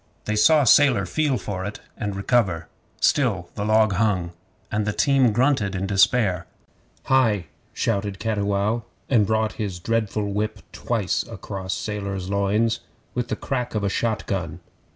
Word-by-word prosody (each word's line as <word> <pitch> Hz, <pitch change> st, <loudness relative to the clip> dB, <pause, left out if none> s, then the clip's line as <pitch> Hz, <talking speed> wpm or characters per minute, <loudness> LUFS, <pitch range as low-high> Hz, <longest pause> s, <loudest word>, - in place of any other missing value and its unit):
They 105 Hz, -, -1 dB
saw 145 Hz, +8 st, +5 dB
Sailor 125 Hz, -5 st, +5 dB
feel 145 Hz, -, 0 dB
for 95 Hz, -1 st, -4 dB
it, 105 Hz, +2 st, -5 dB, 0.2 s
and 100 Hz, -2 st, -4 dB
recover. 100 Hz, -6 st, +1 dB, 0.3 s
Still 100 Hz, -11 st, +1 dB
the 100 Hz, -, -4 dB
log 110 Hz, 0 st, +3 dB
hung, 95 Hz, -4 st, +1 dB, 0.4 s
and 105 Hz, 0 st, -1 dB
the 105 Hz, -, 0 dB
team 130 Hz, +2 st, +3 dB
grunted 115 Hz, -4 st, +1 dB
in 95 Hz, +1 st, -2 dB
despair. 95 Hz, -2 st, +2 dB, 0.6 s
'Hai!' 115 Hz, -9 st, +2 dB, 0.3 s
shouted 100 Hz, -3 st, -1 dB
Cattiwow, 105 Hz, +1 st, 0 dB, 0.3 s
and 110 Hz, -6 st, +4 dB
brought 110 Hz, 0 st, +1 dB
his 100 Hz, -4 st, -3 dB
dreadful 110 Hz, +2 st, -1 dB
whip 105 Hz, 0 st, -2 dB
twice 110 Hz, -6 st, -1 dB
across 95 Hz, -3 st, -5 dB
Sailor's 100 Hz, -3 st, -4 dB
loins 105 Hz, +3 st, +1 dB, 0.3 s
with 120 Hz, -1 st, -2 dB
the -, -, -2 dB
crack 125 Hz, -4 st, -3 dB
of 105 Hz, -, 0 dB
a 100 Hz, -, +1 dB
shot 110 Hz, +2 st, -1 dB
gun. 85 Hz, -4 st, -3 dB
105 Hz, 150 wpm, -23 LUFS, 100-115 Hz, 0.6 s, saw